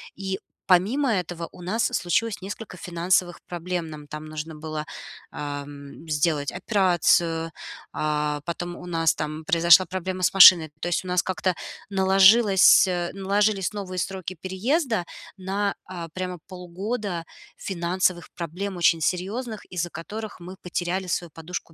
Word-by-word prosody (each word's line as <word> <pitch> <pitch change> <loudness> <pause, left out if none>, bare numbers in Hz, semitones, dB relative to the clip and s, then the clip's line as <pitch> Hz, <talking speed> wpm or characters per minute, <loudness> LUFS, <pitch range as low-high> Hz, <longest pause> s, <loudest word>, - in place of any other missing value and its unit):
И 190 0 -4 0.3
помимо 225 +9 +3
этого 175 -3 -3
у 180 - -13
нас 215 +6 0
случилось 220 +4 -1
несколько 200 0 -7
финансовых 175 +1 0
проблем. 175 -1 -4
Нам 150 -1 -10
там 150 +1 -7
нужно 155 +1 -6
было, 155 0 -5 0.5
ам, 145 +1 -7
сделать 150 -1 +1
операцию, 170 -5 +2 0.4
а, 150 -1 -1
потом 175 +1 -4
у - - -10
нас 165 -2 +2
там 155 +1 -4
произошла 170 +3 +6
проблема 185 +1 -4
с - - +3
машиной. 175 -5 +9
То 175 - -3
есть 175 - 0
у - - -6
нас 180 0 +2
как-то 185 -1 -1 0.3
наложилось 195 +1 +6
э, 175 -1 -1
наложились 200 0 +1
новые 185 -3 -5
сроки 185 -1 -4
переезда 220 - 0 0.3
на, 195 +2 -1
а, 175 -2 -7
прямо 180 -1 -4
полгода 185 +1 -4 0.3
финансовых 180 -1 -1
проблем, 180 +3 -5
очень 170 -1 +3
серьезных, 210 +7 -2
из-за 175 -1 -3
которых 210 +7 -7
мы 180 +2 -9
потеряли 180 +1 -2
свою 175 -2 -2
подушку 165 +1 -7
180 Hz, 140 wpm, -25 LUFS, 165-190 Hz, 0.5 s, машиной